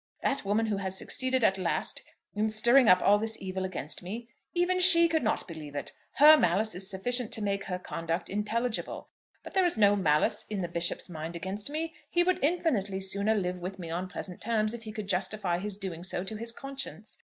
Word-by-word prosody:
That 275 - +1
woman 210 +3 +1
who 210 -2 -1
has 190 -1 -3
succeeded 260 +2 0
at 195 -2 +3
last 185 - -1 0.3
in 215 +1 0
stirring 235 +4 +5
up 180 -1 +6
all 205 +1 +5
this 220 +1 -1
evil 190 0 -4
against 180 -5 -4
me, 225 +6 -7 0.3
even 360 +1 +2
she 345 -2 +7
could 320 -1 0
not 220 - -1
believe 155 -4 -9
it. 145 - -3 0.2
Her 305 +2 +8
malice 210 - +1
is 190 +1 -2
sufficient 240 +4 0
to 225 - -1
make 200 -1 -1
her 180 - -3
conduct 165 -1 -4
intelligible; 220 +4 -2 0.3
but - - -10
there 380 -1 +3
is 350 -8 +2
no 205 -1 +5
malice 155 -6 +2
in 205 -3 -3
the 175 - -2
Bishop's 170 0 0
mind 165 -1 -6
against 195 +6 -4
me. 320 +2 -3 0.2
He 345 - +3
would 365 -3 0
infinitely 270 - 0
sooner 200 +3 +2
live 180 -3 -2
with 185 +2 -6
me 170 -3 -6
on 180 +2 -3
pleasant 180 0 -6
terms 215 -1 0
if 235 - -7
he 220 -1 -8
could 215 -2 -6
justify 185 -1 -1
his 200 +1 -4
doing 180 -4 -6
so 185 -1 -2
to 195 +3 -5
his 230 +2 -2
conscience. 275 +3 -7
205 Hz, 210 wpm, -29 LUFS, 185-235 Hz, 0.3 s, Her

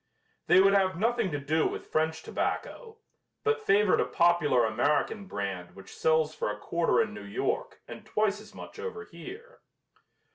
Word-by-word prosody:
They - - +6
would 195 +1 +5
have 190 -3 +2
nothing 230 +1 +1
to 145 -3 -3
do 155 +3 +1
with - - -7
French 160 0 0
tobacco, 455 -3 -4 0.5
but 440 +1 +1
favored 200 0 +3
a - - +2
popular 170 -8 +3
American 145 - 0
brand 95 - -5
which 95 - -12
sells 160 -1 +2
for 155 - -2
a 105 - -4
quarter 170 +10 +1
in 220 -2 +1
New - - -8
York 100 0 -3
and - - -9
twice 210 -1 0
as 215 - -15
much - - -10
over 450 -1 -5
here. 465 +6 -11
175 Hz, 170 wpm, -29 LUFS, 145-215 Hz, 0.5 s, They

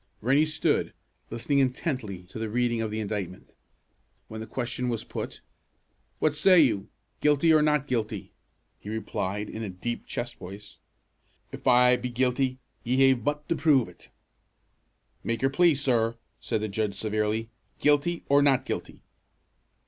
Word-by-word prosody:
Rennie 140 +7 +3
stood, 155 - 0 0.4
listening 130 +5 0
intently 130 - -1
to 95 +4 -10
the 110 -1 -3
reading 120 0 0
of 110 - -2
the 110 +1 -3
indictment. 100 -4 -5 0.8
When 110 0 -7
the 110 - -7
question 125 +1 -3
was 115 -3 -2
put: - - -6 0.8
"What 155 - +1
say 175 +5 +5
you, 110 -9 +2 0.3
guilty, 150 +2 +4
or 155 - +5
not 150 -2 +2
guilty?" 110 -6 -3 0.5
he 105 - -9
replied, 105 -2 -3
in 110 - -7
a 110 - -4
deep, 105 +6 -5
chest 120 0 -5
voice, 100 +2 -11 0.7
"If - - -7
I 125 0 +6
be 125 - -4
guilty, 130 +1 0 0.3
ye 135 +2 +4
ha' 120 - -6
but 150 0 -2
to 170 - +2
prove 145 -7 +3
it." - - -16 1.1
"Make 115 +2 -2
your 135 - +3
plea, 170 +2 +4
sir!" 120 -4 +1 0.2
said 105 - -2
the 110 - -1
judge 105 0 -2
severely. 110 +2 -1 0.3
"Guilty, 150 +4 +2
or 140 +1 +5
not 140 -3 +3
guilty?" - - -5
120 Hz, 155 wpm, -27 LUFS, 110-140 Hz, 1.1 s, I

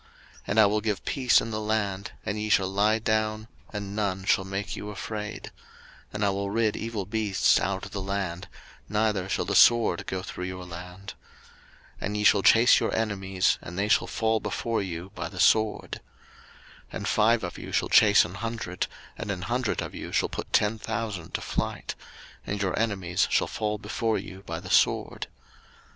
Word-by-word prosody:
03:026:006 - - -26 0.4
And 105 - +2
I 110 - +8
will 105 +1 +1
give 105 -3 -2
peace 130 -3 +3
in 115 - -5
the 110 0 -2
land, 105 -2 -1
and 105 0 -2
ye 105 0 -2
shall 100 -2 +4
lie 105 +3 +2
down, 110 0 -1 0.2
and 100 -1 -5
none 95 -3 -1
shall 95 - +3
make 95 +1 -4
you 105 - -6
afraid: 105 +1 -6 0.6
and 105 0 -1
I 100 - +3
will 100 0 -2
rid 110 0 +1
evil 110 -3 -4
beasts 105 -2 +2
out 95 -1 -2
of - - -10
the 100 - -4
land, 95 -3 -3 0.4
neither 105 -3 0
shall - - 0
the - - -2
sword 115 -4 +5
go 95 0 -3
through 90 -1 -6
your 90 0 -6
land. 90 +3 -9 0.9
03:026:007 - - -3
And 105 +1 -2
ye 105 - -1
shall 100 -1 +5
chase 115 +5 +6
your - - -1
enemies, 95 -4 0
and 85 +1 -8
they 100 +1 +1
shall 110 - +3
fall 110 -1 +1
before 115 +2 -2
you 90 0 -5
by 85 -3 -5
the 90 - -9
sword. 110 +2 +2 0.9
03:026:008 - - -20
And - - -4
five 110 +1 +3
of 90 - -5
you - - -8
shall - - 0
chase 105 -3 +6
an 90 - -8
hundred, 100 -3 -3 0.3
and - - -5
an 90 -3 -3
hundred 120 +3 -1
of - - -7
you - - -7
shall - - +1
put - - -6
ten 105 +1 +2
thousand 105 -7 -4
to - - -2
flight: - - -3 0.5
and 100 - -2
your 95 -2 0
enemies 95 -6 0
shall - - +3
fall 105 -1 -2
before 110 +2 -1
you 95 0 -8
by - - -4
the - - -8
sword. - - +2
105 Hz, 195 wpm, -27 LUFS, 95-110 Hz, 0.9 s, I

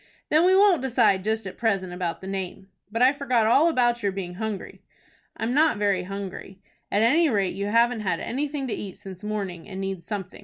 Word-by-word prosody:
"Then 315 +3 +4
we 375 +1 +5
won't 390 -5 +5
decide 225 -7 +2
just 220 +1 -1
at 190 - -8
present 195 -5 0
about 180 -2 -3
the - - -9
name. 190 0 -5 0.2
But 230 +3 +1
I 260 +2 +6
forgot 255 -6 +1
all 280 +9 +5
about 240 -5 +2
your 200 -2 0
being 185 -2 -5
hungry." 215 +1 -5 0.6
"I'm 225 +2 -1
not 305 -4 +3
very 200 -3 +1
hungry." 195 0 -7 0.3
"At 205 - +2
any 310 +8 +4
rate 200 -6 0
you 200 +1 -3
haven't 235 +2 +3
had 195 - -1
anything 280 +2 -3
to - - -1
eat 195 -2 -6
since 195 -1 -11
morning, 200 -4 -4
and 190 -1 -6
need 195 -2 -4
something. 195 -4 -6
210 Hz, 205 wpm, -25 LUFS, 195-250 Hz, 0.6 s, I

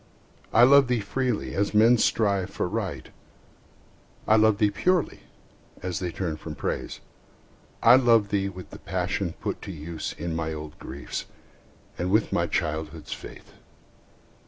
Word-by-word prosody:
I 120 - +6
love 140 +1 +7
thee 125 -1 +1
freely, 120 +2 -2
as 100 +1 -1
men 115 +3 +6
strive 100 -5 +1
for - - -2
Right; - - -4 1.2
I 110 - +6
love 110 -1 +4
thee 105 -1 +3
purely, 180 - +1 0.6
as 90 -2 -2
they 90 - -2
turn 85 -3 -3
from 80 0 -8
Praise. - - -4 0.8
I 120 +2 +8
love 115 -5 +4
thee 100 -1 0
with 90 -1 -10
the - - -10
passion - - -2
put - - -5
to - - -7
use 80 -1 -6
In 85 0 -3
my 80 -1 -2
old 75 0 -8
griefs, 70 - -6 0.7
and 90 - -1
with 105 +3 +2
my - - +1
childhood's 80 0 -3
faith. - - -11
100 Hz, 150 wpm, -26 LUFS, 80-115 Hz, 1.2 s, I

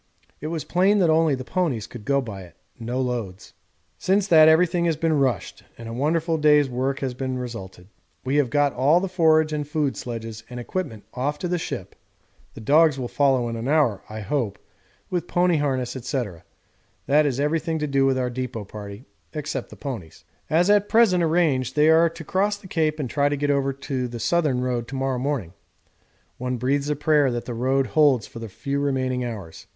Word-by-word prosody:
It 150 - -5
was 160 -1 -3
plain 190 +4 +2
that 175 -5 +3
only 160 -2 +3
the 130 - -6
ponies 135 - -1
could 115 -4 -11
go 140 0 +2
by 105 -6 -7
it 90 -2 -14 0.2
no 120 +2 -3
loads. 115 -7 -4 0.5
Since 195 +1 +2
that 155 -2 +8
everything 170 +2 +3
has 165 -3 +1
been 160 -2 +1
rushed 130 -8 -1 0.2
and 115 - -9
a 115 - -6
wonderful 160 +5 0
day's 150 -1 +5
work 130 +2 -2
has 130 -2 -2
resulted; 120 -8 -5 0.4
we 135 +3 +1
have 140 -4 +2
got 145 0 +2
all 140 +7 +4
the 195 - -2
forage 160 -4 +3
and 150 -1 -2
food 150 -2 -1
sledges 115 -2 -6
and 125 -1 -7
equipment 120 - -4
off 140 +4 -2
to 180 - -3
the 175 0 -1
ship - - -6 0.6
the - - -9
dogs 150 +4 +4
will 125 -2 -3
follow 135 -2 +2
in 115 - -4
an 115 +2 -4
hour, 140 -9 +2
I 110 0 -6
hope, 110 -4 -2 0.5
with 180 -2 -2
pony 175 -1 +2
harness, 130 -4 -1
&c., 130 +1 -2 0.8
that 150 +2 +4
is 135 -2 -2
everything 160 +2 0
to 150 - -1
do 140 -2 +1
with 135 -1 +2
our 125 -1 -1
depôt 120 -4 -5
party, 105 +3 -9 0.3
except 150 -4 -4
the - - -11
ponies. 110 - -7 0.3
As 170 +3 +3
at 205 0 +3
present 220 -6 +4
arranged 155 -7 +1
they 150 +1 +5
are 165 +1 +5
to 165 0 -10
cross 200 +6 0
the 205 - -18
Cape 155 -4 0
and 140 - -2
try 140 +3 +1
to 145 - -1
get 145 +1 +1
over 135 -1 +1
the 130 -3 -4
Southern 135 +1 +1
Road 125 -2 -2
to 135 - -7
morrow 135 -1 -1
morning. 125 - -2 0.9
One 125 0 -2
breathes 140 +4 0
a 150 - +1
prayer 150 -1 +3
that 120 -1 -3
the 120 - -5
Road 130 +3 +1
holds 140 -6 +3
for 115 - -10
the 115 -1 -7
few 140 +8 -3
remaining 130 -3 -1
hours. 105 -9 -7
140 Hz, 200 wpm, -24 LUFS, 125-155 Hz, 0.9 s, that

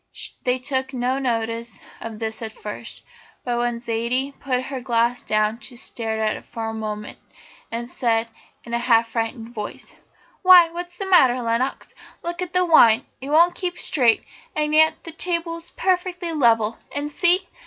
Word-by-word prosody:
They 250 0 +1
took 265 +1 -3
no 255 +2 0
notice 230 -3 -2 0.2
of 225 -1 -7
this 220 0 -4
at 220 -1 -5
first, 210 +2 -7 0.4
but 240 -1 0
when 240 -1 -1
Zaidie 235 +4 -1
put 255 -2 -1
her 265 -1 -5
glass 240 0 +1
down 215 +1 0
she 245 +2 -9
stared 225 -3 -4
at 215 -1 +1
it - - -10
for 225 -1 -5
a - - -5
moment, 215 -1 -5 0.5
and 235 +1 -4
said, 230 -2 0 0.4
in 235 - -9
a 235 - +1
half 230 -1 +3
frightened 225 0 -3
voice: 210 -3 -7 0.5
"Why, 365 -3 +8
what's 350 +1 -7
the 390 - -4
matter, 265 -10 +5
Lenox? 235 +3 -1 0.3
look 345 +1 -4
at 360 -1 -4
the 365 0 +3
wine! 270 -8 +6 0.2
It 270 - -6
won't 335 +4 +5
keep 355 -2 -3
straight, 245 -10 +2 0.3
and 300 0 0
yet 315 +1 +4
the 330 - -7
table's 335 0 -2
perfectly 360 -2 -1
level 230 -6 +2
and 290 +1 -3
see! 360 +3 +3
250 Hz, 170 wpm, -23 LUFS, 230-325 Hz, 0.5 s, Why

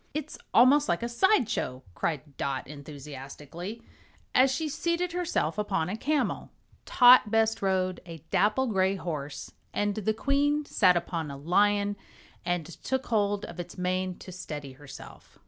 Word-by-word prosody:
"It's 305 0 -4 0.2
almost 280 +5 +5
like - - 0
a - - 0
side 265 - +3
show!" 130 - -3
cried 145 - -3
Dot 135 -1 -3
enthusiastically, 145 - -9 0.5
as 260 +1 +5
she 310 +4 -1
seated 340 +4 -1
herself 330 - -1
upon 195 -5 -1
a 200 - -2
camel. 290 +6 -1 0.4
Tot 245 -3 +7
bestrode 195 -4 +1
a 165 -1 -7
dapple 210 +7 +2
gray 190 -4 +1
horse, 150 -6 -5 0.2
and 205 0 +1
the 215 +1 -1
Queen 290 +4 +1
sat 185 -9 +4
upon 165 -2 -3
a 140 - -7
lion 205 +6 +2 0.5
and 175 -2 -1
took 260 - -4
hold 205 -2 0
of - - -10
its 175 - -7
mane 185 0 -1
to 185 - -10
steady 150 -6 -7
herself. 135 0 -13
195 Hz, 145 wpm, -28 LUFS, 165-240 Hz, 0.5 s, Tot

